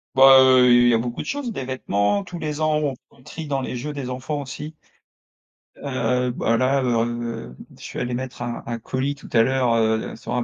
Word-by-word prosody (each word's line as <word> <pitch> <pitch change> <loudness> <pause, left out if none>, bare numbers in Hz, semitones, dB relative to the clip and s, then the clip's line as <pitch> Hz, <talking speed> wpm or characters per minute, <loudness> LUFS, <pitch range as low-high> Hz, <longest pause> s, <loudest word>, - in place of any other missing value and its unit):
Bah, 135 0 +8
heu, 130 -1 +6
il 120 0 +6
y - - +4
a 115 - +4
beaucoup 120 0 -4
de - - -8
choses, 280 -4 -3
des 135 - -5
vêtements. 130 - 0
Tous 180 -2 -8
les 155 -1 -4
ans, 155 0 +2
on 150 -2 -1 0.2
on 125 - -22
trie 160 +2 -8
dans 135 -2 -1
les 130 - -4
jeux 145 +5 -5
des 135 -3 -5
enfants 135 +4 -4
aussi 145 +3 -7 1.0
Heu, 125 -2 -1
bah, 115 -1 0
là, 130 +2 +2
heu, 115 - -2 0.2
je - - -17
suis - - -8
allé 125 - -2
mettre 125 0 -5
un 120 -1 -4
un 120 0 -3
colis 130 +5 -3
tout 140 - -14
à 115 - +5
l'heure, 125 0 +2
heu, 110 -1 0
sur 120 - -5
un 125 - 0
130 Hz, 225 wpm, -22 LUFS, 120-140 Hz, 1.0 s, Bah